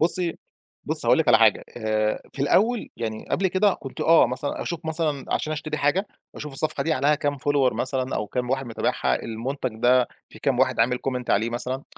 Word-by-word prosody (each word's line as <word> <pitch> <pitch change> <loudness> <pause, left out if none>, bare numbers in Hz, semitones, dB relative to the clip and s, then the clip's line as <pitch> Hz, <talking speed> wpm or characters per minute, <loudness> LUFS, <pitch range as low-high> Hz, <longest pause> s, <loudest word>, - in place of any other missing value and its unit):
بُصّي، 170 +1 +1 0.5
بُصّي - - 0
هاقول - - +5
لِك - - +1
على - - +7
حاجة، - - +4
آآ 110 -1 0
في 135 - -3
الأول 220 - +2
يعني 110 -2 -5
قبل 190 - +1
كده 190 +2 +2
كنت 135 - -9
آه 165 0 +6
مثلًا 125 +4 -3
أشوف 170 -1 -4
مثلًا 155 -3 -1
عشان 155 - -2
أشتري 155 0 -4
حاجة، 165 +8 +1 0.3
وأشوف 150 -2 -7
الصفحة 155 +3 0
دي 160 - 0
عليها 145 +2 +3
كام 145 -1 -2
follower 140 -2 +2
مثلًا، 130 0 -2
أو 105 - -2
كام 125 +3 -3
واحد 135 -1 -1
متابعها، 115 - -1
المنتج 125 +3 -3
ده 125 0 +4 0.2
في - - -14
كام - - 0
واحد - - +2
عامل 125 +2 +2
comment 125 -2 -3
عليه 110 +3 +2
مثلًا، 130 +3 -3
135 Hz, 200 wpm, -24 LUFS, 125-155 Hz, 0.5 s, على